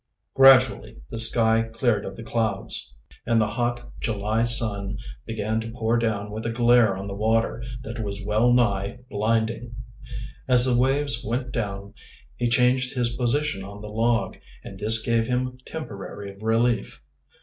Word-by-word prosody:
Gradually 135 - +5
the - - +1
sky 115 0 +5
cleared 115 -1 -1
of 95 - -7
the 115 - -9
clouds, 105 - -1 0.4
and 115 -1 +3
the 110 - +3
hot 120 +2 -3
July 110 +1 -1
sun 110 -4 +1 0.3
began 110 0 -2
to 115 - -7
pour 115 0 -1
down 110 -3 -1
with 110 +1 -6
a - - -2
glare 120 -3 +3
on 95 - -6
the 100 - -6
water 110 +2 0 0.2
that 115 -1 -7
was 100 -1 -5
well 110 +4 +2
nigh 110 -4 +1
blinding. 115 +2 -1 0.7
As 125 -1 +6
the 125 -2 +2
waves 135 0 +2
went 125 +3 -3
down 100 -3 -5 0.4
he 120 - -1
changed 125 +1 +2
his 120 -1 -1
position 130 -3 -1
on 100 +1 -10
the 105 - -8
log, 115 +2 -1 0.2
and 95 - -10
this 110 +1 +5
gave 115 -1 +1
him 125 0 -2
temporary 100 -8 -8
relief. 115 +2 0
115 Hz, 155 wpm, -24 LUFS, 105-120 Hz, 0.7 s, As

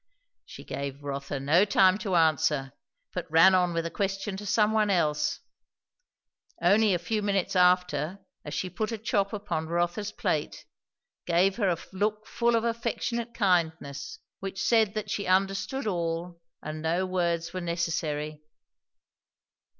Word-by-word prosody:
She - - -10
gave 140 0 -5
Rotha 140 0 -4
no 155 +7 +4
time 195 -1 +4
to 195 -5 -1
answer, 155 -4 +2 0.4
but - - -4
ran 165 +4 +6
on 180 -1 +3
with 165 -1 -2
a 170 - -3
question 195 +2 -2
to 205 +1 -7
some 210 +2 +3
one 215 -1 +2
else; 150 -5 +1 1.2
only 200 +2 +4
a - - +1
few 210 +5 -2
minutes 200 -2 0
after, 180 -2 +2 0.3
as 150 - -6
she 185 - -2
put 215 +5 -2
a 225 - -3
chop 205 -2 0
upon 200 -7 -3
Rotha's 175 +5 -1
plate, - - -2 0.6
gave 180 +3 +3
her 200 -5 +2
a 170 - +1 0.2
look 210 +2 -1
full 235 0 +1
of 225 - +1
affectionate 235 0 -2
kindness 160 - 0 0.2
which 195 0 -5
said 220 -3 +3
that 210 -1 -3
she 200 - -2
understood 195 +6 0
all 170 -2 -3 0.2
and 155 +1 -5
no 170 +4 0
words 170 -2 -1
were 185 - -3
necessary. 160 -3 -2
180 Hz, 150 wpm, -28 LUFS, 165-205 Hz, 1.2 s, ran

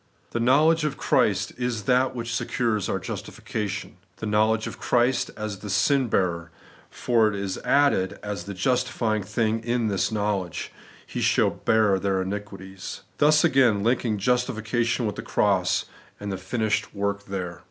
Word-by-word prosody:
The 120 - -2
knowledge 150 +7 +4
of 150 -2 -1
Christ - - +1
is 120 -3 -2
that 130 +4 +2
which 115 -1 -4
secures 115 -3 -1
our - - 0
justification; 100 -4 -5 0.2
the - - -5
knowledge 110 +1 +2
of - - -7
Christ 125 +2 +2
as 105 -2 -4
the 105 - -8
sin 125 +6 +2
hearer: 85 -4 0 0.4
for 115 -3 +2
it 105 - -4
is 100 -1 -3
added, 140 -10 +2
as 105 -1 -4
the 100 -1 -6
justifying 115 0 0
thing 110 +2 -1
in 120 -1 0
this 100 +1 0
knowledge, 105 -5 -2 0.2
* - - -23
He - - -5
shall - - +3
bear 110 -4 +2
their 95 -1 0
iniquities;' 95 -1 -6 0.2
thus 150 +1 +5
again 120 -7 +4
linking 115 -2 +1
justification 120 +1 0
with 105 -1 -3
the - - -3
cross, 95 -3 +1 0.3
and 105 0 -4
the 95 - -3
finished 110 +2 -2
work 100 0 -2
there. 90 -4 -4
110 Hz, 160 wpm, -25 LUFS, 100-120 Hz, 0.4 s, thus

